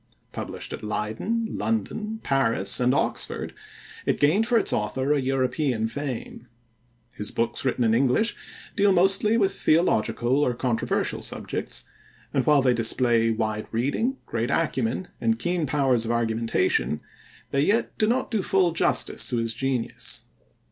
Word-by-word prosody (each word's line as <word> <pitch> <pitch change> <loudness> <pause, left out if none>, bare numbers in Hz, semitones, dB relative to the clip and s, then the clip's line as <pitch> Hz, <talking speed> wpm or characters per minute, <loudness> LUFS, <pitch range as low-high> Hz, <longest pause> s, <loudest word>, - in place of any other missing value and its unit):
Published - - -6
at - - -6
Leyden, 110 - -2
London, 220 -1 -3
Paris, 115 -8 +1
and 125 0 +3
Oxford, 140 - -1 0.5
it - - 0
gained 185 +10 +3
for 240 -1 +3
its 220 - +2
author 130 +7 0
a 145 - +1
European 130 -2 0
fame. 125 0 -5 0.7
His 105 - -4
books 115 0 -1
written 130 -2 0
in 110 -1 +3
English 135 - +2 0.4
deal 205 -2 +4
mostly 195 +5 +4
with 195 -3 +2
theological 135 - +2
or 125 -4 +1
controversial 120 -2 -1
subjects, - - -3 0.5
and - - 0
while 150 -3 +5
they 125 -2 +4
display 115 0 +2
wide 110 -1 -2
reading, 145 - 0
great 115 +1 -2
acumen, 140 0 -1
and 230 0 +2
keen 175 -5 -1
powers 130 -4 +2
of 115 - -3
argumentation, 115 -8 +1 0.5
they 140 - +2
yet 205 +10 +1
do 215 - +3
not 250 +3 0
do 220 -3 +1
full 185 -2 +2
justice 165 - +1
to 125 - -1
his 115 -1 -1
genius. 130 -2 -2
135 Hz, 145 wpm, -25 LUFS, 115-185 Hz, 0.7 s, while